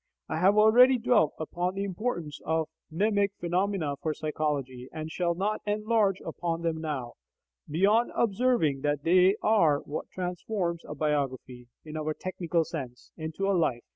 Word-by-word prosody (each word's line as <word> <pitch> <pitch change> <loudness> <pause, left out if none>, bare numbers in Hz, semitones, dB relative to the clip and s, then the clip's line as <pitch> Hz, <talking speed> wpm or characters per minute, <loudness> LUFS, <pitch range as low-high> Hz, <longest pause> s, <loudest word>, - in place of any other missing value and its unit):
I 160 - -2
have 195 +4 +4
already 245 +5 +7
dwelt 220 -9 +2
upon 175 +4 -2
the 195 - -2
importance 185 -6 -3
of 160 -1 0 0.2
mnemic 200 +3 +1
phenomena 175 -4 -1
for 155 -1 -1
psychology, 140 -5 -3
and 155 0 -6
shall 170 0 0
not 205 +4 -1
enlarge 210 -2 +1
upon 165 0 -3
them 160 -1 -1
now, 140 -7 -4 0.6
beyond 200 +9 +3
observing 210 - +2
that 145 0 -1
they 185 +3 +5
are 165 -10 +4
what 145 - -6
transforms 180 -1 -3
a 150 - -5
biography 135 -5 -2 0.2
(in 155 0 -6
our 155 0 -2
technical 175 -2 -1
sense) 130 -7 -7
into 160 +5 -3
a 200 - +3
life. 155 -10 +1
170 Hz, 150 wpm, -28 LUFS, 155-200 Hz, 0.6 s, already